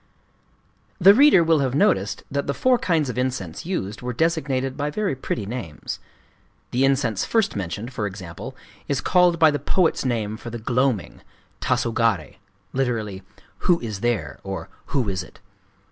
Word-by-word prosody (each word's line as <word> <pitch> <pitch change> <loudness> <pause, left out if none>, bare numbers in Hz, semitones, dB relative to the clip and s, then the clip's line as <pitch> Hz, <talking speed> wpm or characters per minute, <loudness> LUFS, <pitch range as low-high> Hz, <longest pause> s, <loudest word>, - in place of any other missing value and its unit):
The 195 +2 +9
reader 265 - +7
will 165 -1 +3
have 135 -2 0
noticed 100 -8 +2
that 140 +1 -1
the 140 - -1
four 255 -1 +3
kinds 160 -5 +1
of 125 0 -3
incense 125 - -3
used 105 - -3
were 125 0 -3
designated 135 -3 0
by 145 +1 -1
very 200 -1 -1
pretty 120 -4 -3
names. 105 -9 -5 0.7
The 125 +2 +2
incense 135 -6 +2
first 225 -3 +1
mentioned, 100 +6 -4
for 105 -4 -1
example, 95 +6 -8 0.3
is 140 -3 0
called 180 +1 +4
by 160 -2 +6
the 145 - -1
poets' 180 -4 +1
name 110 -4 -1
for 120 - -8
the 120 - -5
gloaming,—Tasogaré 115 - -1 0.4
(lit: 115 -7 -1 0.4
"Who 175 -2 +3
is 110 -4 -5
there?" 100 - -1
or 95 -4 -5
" - - -32
Who 135 -7 0
is 95 -2 -1
it?") - - -13
125 Hz, 160 wpm, -23 LUFS, 105-150 Hz, 0.7 s, The